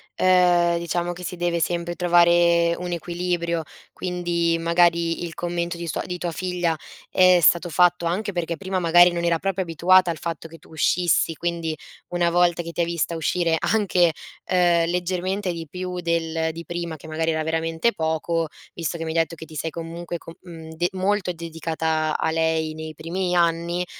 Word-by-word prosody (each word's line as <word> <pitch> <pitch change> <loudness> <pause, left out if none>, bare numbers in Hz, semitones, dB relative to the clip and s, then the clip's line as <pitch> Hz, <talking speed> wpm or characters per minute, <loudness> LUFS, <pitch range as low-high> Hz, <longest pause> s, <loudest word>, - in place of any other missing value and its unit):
ehm, 175 -2 +4
diciamo 175 +1 -2
che 180 +1 -10
si 180 +1 -5
deve 170 -1 0
sempre 175 +1 -1
trovare 170 -1 +4
un 180 0 -5
equilibrio, 170 -1 -2 0.3
quindi 175 -2 -1
magari 170 0 +2
il 170 -1 -5
commento 175 0 -3
di 170 0 -6
sua 155 - -2
di 180 0 -4
tua 175 -1 -3
figlia 180 -2 -1 0.3
è 185 -1 +5
stato 170 +3 +4
fatto 175 +1 +3
anche 195 +4 -1
perché 170 -2 -2
prima 190 +2 -2
magari 175 +1 +6
non 170 0 -2
era 170 -1 +2
proprio 195 0 -1
abituata 175 +2 +4
al 165 - -5
fatto 165 0 -5
che 165 - -12
tu 155 - -21
uscissi, 170 +1 +2
quindi 170 -1 -2 0.4
una 175 -1 +1
volta 175 0 +2
che 170 0 -8
ti 175 - -1
ha - - +4
vista 170 0 -2
uscire 165 +1 +1
anche, 185 -6 +2 0.3
ehm, 175 -2 +2
leggermente 180 +2 -1
di 165 -1 -6
più 180 +2 -5
del 165 -1 -1
di 165 +1 -9
prima, 170 -2 -4
che 155 - -13
magari 160 +1 -1
era 155 0 -1
veramente 165 +7 0
poco, 160 +1 -1 0.3
visto 170 0 -3
che 165 - -5
mi 160 - -3
hai 165 - +1
detto 165 +1 0
che 160 - -9
ti 160 - -13
sei 160 - -2
comunque 170 +1 -6
co 165 - -12
mhmm, 165 -3 -10
de 175 +2 0
molto 190 0 0
dedicata 160 -1 -2
a - - -4
a - - +2
lei 160 -1 0
nei 160 0 -7
primi 175 +4 -3
anni, 170 +1 +1
170 Hz, 190 wpm, -23 LUFS, 165-175 Hz, 0.4 s, magari